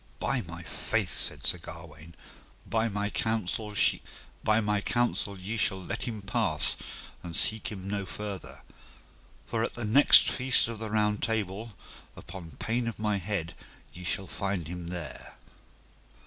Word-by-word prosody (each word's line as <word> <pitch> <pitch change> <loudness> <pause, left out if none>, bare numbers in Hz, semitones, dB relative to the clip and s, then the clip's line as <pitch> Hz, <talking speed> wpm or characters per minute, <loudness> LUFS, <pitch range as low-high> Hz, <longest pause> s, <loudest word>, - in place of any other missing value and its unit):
By - - +1
my - - -8
faith, - - -1
said 75 -2 0
Sir 90 - +2
Gawaine, 80 -1 -11 0.5
by 115 0 +1
my 105 0 -1
counsel 110 -1 -1
ye 105 -1 +1
shall 95 -2 +1
let 110 - -3
him 110 -4 -4
pass 100 - +1 0.5
and 85 -2 -6
seek 110 0 +2
him 95 -2 -6
no 100 -1 -2
further; 100 -4 -6 0.8
for 115 - -1
at - - -2
the 120 -1 -3
next 130 +7 +8
feast 130 -2 +4
of 115 -2 -5
the 110 -1 -4
Round 105 -1 +2
Table, 110 -2 -2 0.4
upon 85 -4 -9
pain 115 +1 0
of 115 - -3
my 105 -1 +1
head 95 -3 -2 0.4
ye 90 - -9
shall 95 +2 -1
find 95 -3 -2
him 90 0 -5
there. 85 -5 -7
105 Hz, 140 wpm, -29 LUFS, 90-110 Hz, 0.8 s, next